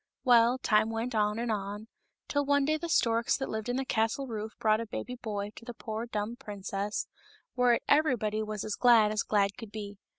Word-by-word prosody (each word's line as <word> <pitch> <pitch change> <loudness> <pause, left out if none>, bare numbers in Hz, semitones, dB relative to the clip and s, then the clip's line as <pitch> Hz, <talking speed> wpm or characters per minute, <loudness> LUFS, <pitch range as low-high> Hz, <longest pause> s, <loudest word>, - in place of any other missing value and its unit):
Well, 240 -1 +5
time 215 -3 +2
went 225 +2 -3
on 210 -1 +1
and 235 0 -1
on, 205 +1 -4 0.4
till 285 0 0
one 285 0 +2
day 310 +2 +2
the 340 +2 -5
storks 230 -5 +2
that 270 - -4
lived 220 +2 -3
on 245 - 0
the 265 +1 -1
castle 225 +4 0
roof 220 -3 -5
brought 215 0 +2
a 230 - -6
baby 250 +3 -5
boy 210 -4 -4
to - - -10
the 240 0 -8
poor 220 +2 -5
dumb 215 +1 -3
princess, 205 -3 -4 0.5
whereat 245 -2 +3
every 300 -2 +4
body 215 -1 -2
was 215 -1 -4
as 215 - -3
glad 230 -3 +5
as 215 -1 0
glad 200 -2 +1
could 225 -3 -9
be. 205 -2 -7
225 Hz, 210 wpm, -30 LUFS, 210-245 Hz, 0.5 s, Well